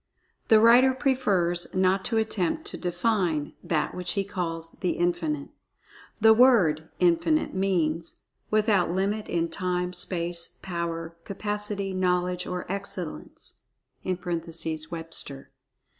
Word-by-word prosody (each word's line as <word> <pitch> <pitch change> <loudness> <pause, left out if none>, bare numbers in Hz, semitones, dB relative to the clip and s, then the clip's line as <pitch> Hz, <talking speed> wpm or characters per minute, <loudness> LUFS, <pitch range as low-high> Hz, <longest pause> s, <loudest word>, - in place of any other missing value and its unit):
The 220 - +7
writer 245 +4 +6
prefers 195 -12 +1
not 190 +1 +3
to 230 - 0
attempt 220 - 0
to - - -5
"define" 175 -4 0
THAT 155 -3 0
which 180 -1 -2
he 200 - 0
calls 165 -4 -4
"The 180 - +1
Infinite." 170 -5 -1 0.7
The 220 0 +7
word 205 -11 +4
"Infinite" 180 - +2
means 170 -4 -1 0.3
"without 210 -5 +3
limit 200 +4 -1
in 170 -1 0
time, 180 0 -2
space, 170 -2 -3
power, 170 -2 -4
capacity, 205 0 -3
knowledge 180 -1 0
or 180 -1 -3
excellence" 185 - -6 0.4
(Webster). 165 -4 -4
180 Hz, 110 wpm, -27 LUFS, 170-205 Hz, 0.7 s, The